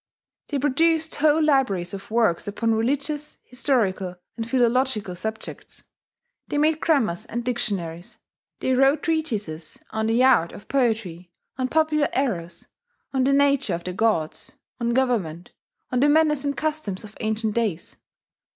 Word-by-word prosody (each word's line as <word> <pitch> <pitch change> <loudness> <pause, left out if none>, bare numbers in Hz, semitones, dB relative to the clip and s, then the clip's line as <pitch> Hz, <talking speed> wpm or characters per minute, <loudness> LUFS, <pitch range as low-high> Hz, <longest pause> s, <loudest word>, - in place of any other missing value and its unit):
They 290 - -2
produced 320 +4 +2
whole 310 +1 +4
libraries 255 - +1
of 195 0 -8
works 220 -7 +1
upon 225 +2 0
religious, 285 +6 -1
historical, 205 -8 0 0.2
and 225 -1 -5
philological 245 -6 +1
subjects; 220 +5 -6 0.6
they - - -2
made 310 +1 +2
grammars 225 - +1
and 240 +1 -4
dictionaries; 185 -8 -3 0.4
they 260 - +1
wrote 270 +3 +3
treatises 215 - -2
on 220 0 -1
the 230 +3 +3
art 245 -11 +4
of - - -12
poetry, 220 -10 -1 0.3
on 255 - +1
popular 305 0 +2
errors, 190 -11 -2 0.5
on 260 -1 +2
the 275 - +3
nature 280 -8 +3
of 170 - -7
the 180 - -4
gods, 185 -6 -1 0.3
on 235 0 0
government, 195 -11 0 0.4
on 250 - +1
the 290 +3 +4
manners 300 -2 +3
and 285 0 -1
customs 305 -12 -2
of 215 0 -12
ancient 220 0 -1
days.... 210 -8 -2
235 Hz, 140 wpm, -24 LUFS, 200-280 Hz, 0.6 s, whole